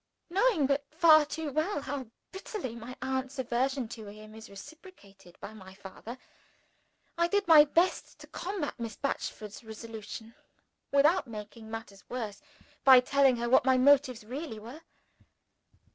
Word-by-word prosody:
Knowing 395 - +3
but 280 +1 +1 0.5
too 305 0 -4
well 310 +3 -1
how 275 -2 -5 0.2
bitterly 380 - -6
my 235 +2 -9
aunt's 265 +1 -3
aversion 260 +1 -1
to 220 -2 -9
him 215 +1 -12
is 220 0 -12
reciprocated 200 - -14
by 215 - -9
my 190 -3 -13
father, 205 +5 -10 1.0
I 340 - +4
did 405 +1 0
my 310 -3 +9
best 340 +5 0
to - - -10
combat 360 -8 -5
Miss 230 -3 -5
Batchford's 215 -6 -5
resolution 220 0 -9 0.6
without 285 +2 +3
making 220 0 -9
matters 220 -3 -8
worse 225 -4 -5 0.4
by 260 -2 +9
telling 270 0 +3
her 235 0 -3
what 250 - +5
my 260 0 +3
motives 260 -3 +4
really 260 +1 -6
were. 235 +9 -10
255 Hz, 140 wpm, -30 LUFS, 220-290 Hz, 1.0 s, my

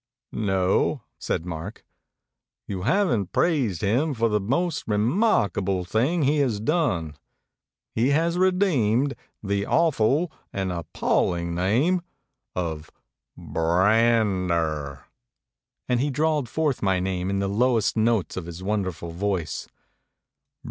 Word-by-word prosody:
"No," 95 +5 +1 0.2
said 80 - -2
Mark. 90 +4 -7 0.8
"You 95 -2 -5
haven't 120 - +1
praised 130 - +1
him 130 +9 +1
for 115 0 +1
the 105 0 +1
most 140 - -1
remarkable 105 - +1
thing 135 - +1
he 145 +3 +2
has 125 -7 +1
done. 110 - 0 0.8
He 120 +4 +2
has 165 +4 +2
redeemed 150 - +2 0.3
the 100 0 -1
awful 155 0 +2 0.2
and 95 -1 -2
appalling 85 0 -1
name 120 - +2 0.5
of 80 -3 -3 0.5
B - - -12
r 85 +4 +3
a - - +4
n 110 -5 +2
d 85 - +1
e - - +2
r," 75 -5 -3 0.8
and 125 -1 +1
he 145 +3 +1
drawled 150 -2 0
forth 150 -2 0
my 95 -2 +2
name 90 0 -2
in 100 - 0
the 100 0 0
lowest 115 +2 +2
notes 110 -5 +1
of 90 -2 -5
his 85 +2 -8
wonderful 95 -5 -2
voice. 90 -1 -2
105 Hz, 130 wpm, -25 LUFS, 90-140 Hz, 0.8 s, a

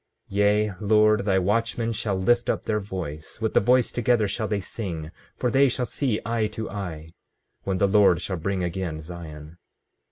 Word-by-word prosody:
15:29 100 - -4
Yea, 105 0 +3
Lord, 105 0 +3
thy 95 -2 +3
watchmen 115 +4 0
shall 105 -2 -2
lift 120 +5 +2
up - - -1
their 105 -1 0
voice; 90 -6 -7
with 110 0 -1
the - - +6
voice 125 +3 +3
together 120 -2 +2
shall 110 +2 -2
they 105 0 -1
sing; 85 -6 -6 0.3
for 125 - 0
they 135 0 +5
shall 125 0 -1
see 125 -4 -1
eye 115 -1 0
to 110 +1 -6
eye, 85 -6 -6 0.5
when 95 -1 0
the 100 - +3
Lord 100 -3 +5
shall 95 - -3
bring 95 +2 -2
again 85 -2 -3
Zion. 80 -1 -10
100 Hz, 185 wpm, -25 LUFS, 90-110 Hz, 0.5 s, the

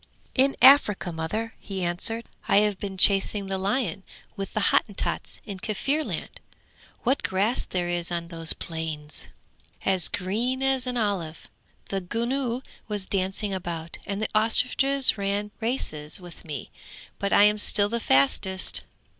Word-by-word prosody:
'In 275 +1 +3
Africa, 255 -9 +6
mother!' 215 +8 -3
he 190 -2 -5
answered. 205 +7 +4 0.2
'I - - +3
have 210 -1 +2
been 195 -2 -5
chasing 200 +1 +4
the 190 0 -3
lion 200 -1 -1 0.3
with 195 0 -6
the 215 - +3
Hottentots 205 - -1
in 200 -3 -7
Kaffirland! 275 +10 -2 0.6
What 265 +3 +1
grass 200 +6 0
there 180 -1 -2
is 175 0 -2
on 170 -1 -3
those 165 -1 0
plains! 160 -2 -6 0.6
as 190 -3 +3
green 235 +8 -2
as 265 -1 +1
an 250 0 -2
olive. 195 -8 -2 0.4
The 195 -1 -2
gnu 240 +5 -2 0.2
was 205 -3 -4
dancing 195 +1 -2
about, 170 -3 -5
and 200 0 -3
the 215 - -2
ostriches 250 +3 +3
ran 200 +1 -2
races 195 - 0
with 175 -2 -13
me, 150 -5 -6 0.5
but 200 - -2
I - - +6
am 210 0 +4
still 205 0 +2
the 235 +2 -1
fastest. 185 +4 +2
200 Hz, 145 wpm, -25 LUFS, 175-230 Hz, 0.6 s, Africa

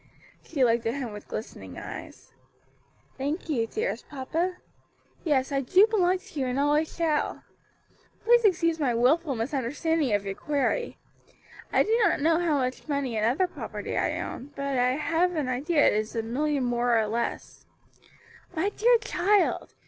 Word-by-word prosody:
She 285 -5 -1
looked 230 -1 +1
at 230 - -1
him 260 -5 -4
with 210 - -10
glistening 220 - -7
eyes. - - -9 0.9
"Thank 295 +6 -3
you, 235 -7 0
dearest 445 - -3
papa; 325 +6 -2 0.7
yes, 280 -4 +1
I 275 -1 +1
do 365 - +5
belong 380 -5 +2
to 370 -5 -9
you 260 - 0
and 250 +2 -1
always 295 +2 +2
shall. 320 -3 0 0.8
Please 475 +1 +5
excuse 335 -5 +2
my 255 -6 +1
wilful 275 +5 +2
misunderstanding 275 +4 -1
of 205 0 -2
your 195 - -2
query. 295 - -1 0.7
I - - +4
do 445 - +1
not 420 - +3
know 325 +3 +3
how 330 -4 +1
much 255 +1 -3
money 280 -5 -1
and 215 0 +1
other 275 +11 +2
property - - -6
I - - 0
own, 270 - -6
but 280 0 -2
have 320 +8 +1
an 300 -4 -1
idea 290 +5 +2
it - - +5
is 215 +2 -2
a 225 - -1
million 280 +4 -1
more 240 -1 +2
or 220 - +2
less." 230 +3 -4 0.9
"My 330 +5 +1
dear 470 +4 +4
child! 410 -1 +1
290 Hz, 165 wpm, -27 LUFS, 250-340 Hz, 0.9 s, do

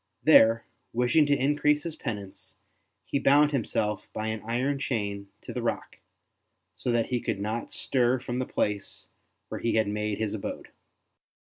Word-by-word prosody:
There, 115 +1 +6 0.3
wishing 125 +6 +3
to 145 -1 +3
increase 150 +2 +2
his 165 -2 -5
penance, 100 -4 -7 0.5
he 140 - -1
bound 145 +2 +5
himself 105 -6 -1
by 110 0 -2
an 110 -1 -3
iron 130 +5 -1
chain 100 -6 -2 0.2
to - - -7
the - - -3
rock, - - -3 0.8
so 125 - -2
that 120 -1 +1
he 125 -2 0
could - - -2
not 110 +3 -3
stir 125 -1 +1
from 125 0 -4
the 130 - -2
place 100 -1 -2 0.4
where - - -5
he 115 - +1
had 110 -2 +3
made 105 0 -2
his 110 -2 -2
abode. 105 - -5
115 Hz, 160 wpm, -28 LUFS, 105-135 Hz, 0.8 s, There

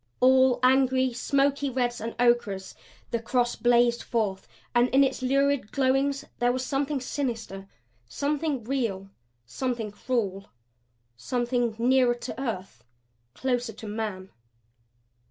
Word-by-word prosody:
All 260 -1 +5
angry, 260 0 +3
smoky 280 +2 +1
reds 245 -2 -1
and 230 +1 -5
ochres 240 -6 +1 0.4
the 235 - -1
cross 240 +1 0
blazed 240 0 +3
forth 210 -5 -2 0.3
and 240 0 +4
in 270 +2 +5
its 265 -1 -1
lurid 275 -2 +1
glowings 275 +1 +1
was 245 +1 +1
something 275 +1 -1
sinister, 230 -7 -4 0.4
something 290 -2 -1
real, 215 -6 -2 0.3
something 235 - -3
cruel, 200 -4 -2 0.7
something 240 - -1
nearer 250 +1 +3
to 240 +1 -7
earth, 205 -8 -5 0.5
closer 245 -3 -1
to 215 - -10
man. 205 -3 -4
245 Hz, 115 wpm, -27 LUFS, 225-265 Hz, 0.7 s, All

